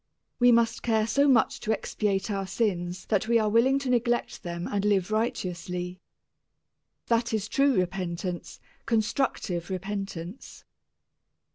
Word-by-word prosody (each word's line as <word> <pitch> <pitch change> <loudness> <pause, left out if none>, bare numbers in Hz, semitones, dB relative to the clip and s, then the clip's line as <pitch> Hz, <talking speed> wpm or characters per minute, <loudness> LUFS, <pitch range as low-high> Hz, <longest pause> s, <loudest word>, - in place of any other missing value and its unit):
We 245 0 +6
must 230 -1 +3
care 220 -2 +2
so 280 +5 +3
much 245 -5 +3
to 215 - -2
expiate 210 -2 -1
our 195 -1 -2
sins 180 -5 -1
that 215 0 +1
we 235 0 +4
are 215 -2 +2
willing 250 +5 +4
to 275 -2 -3
neglect 240 0 0
them 170 0 -5
and 200 -1 -1
live 205 -1 +1
righteously. 180 -5 -2 1.1
That 230 -1 +1
is 215 -1 -2
true 275 +1 +3
repentance, 180 -1 -3 0.3
constructive 220 - 0
repentance. 195 0 -6
210 Hz, 130 wpm, -27 LUFS, 185-230 Hz, 1.1 s, We